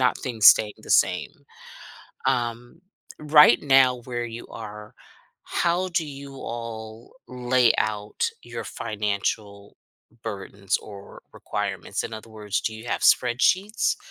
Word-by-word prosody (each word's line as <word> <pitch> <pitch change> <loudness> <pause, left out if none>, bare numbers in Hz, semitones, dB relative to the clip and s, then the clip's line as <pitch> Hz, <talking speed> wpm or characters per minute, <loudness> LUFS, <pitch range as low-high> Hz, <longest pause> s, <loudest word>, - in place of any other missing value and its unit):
not 125 -1 +2
things 115 -5 +1
staying 105 -1 +7
the - - -11
same. - - +3 1.0
Um, 120 +2 -2 0.4
right 150 -4 +6
now 135 -3 +5
where 120 -1 -3
you 115 0 -8
are, 105 -1 -9 0.5
how 175 +2 0
do 170 -3 -1
you 140 -1 -9
all 115 -2 -7
lay 125 -1 +3
out 105 -1 -1
your - - -7
financial 100 -1 -4 0.5
burdens 100 -2 -3
or 100 -2 -12
requirements? - - -4
In 110 - -6
other 110 +1 -10
words, 105 -2 -3
do 110 - -2
you 110 +2 -10
have - - -2
spreadsheets 185 - +3
115 Hz, 125 wpm, -24 LUFS, 105-130 Hz, 1.0 s, staying